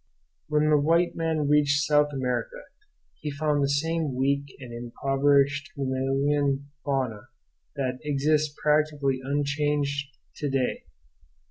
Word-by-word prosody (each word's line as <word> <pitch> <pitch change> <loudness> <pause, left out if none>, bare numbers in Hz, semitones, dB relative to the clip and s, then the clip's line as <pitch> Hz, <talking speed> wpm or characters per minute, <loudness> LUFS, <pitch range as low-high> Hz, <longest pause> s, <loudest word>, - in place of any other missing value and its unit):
When 150 0 +2
the 150 - +5
white 165 +4 +2
man 160 -3 0
reached 145 0 +3
South 150 -1 +3
America 135 - -3 0.6
he 150 - -4
found 145 0 0
the 140 - +1
same 155 0 0
weak 140 +2 +1
and 125 -3 -9
impoverished 140 +3 +1
mammalian 140 +1 0
fauna 130 -6 -2 0.5
that 130 -2 -2
exists 150 +1 +1
practically 150 -3 +2
unchanged 145 0 0 0.3
to 145 - -2
day. 135 -2 -1
140 Hz, 115 wpm, -26 LUFS, 135-150 Hz, 0.6 s, the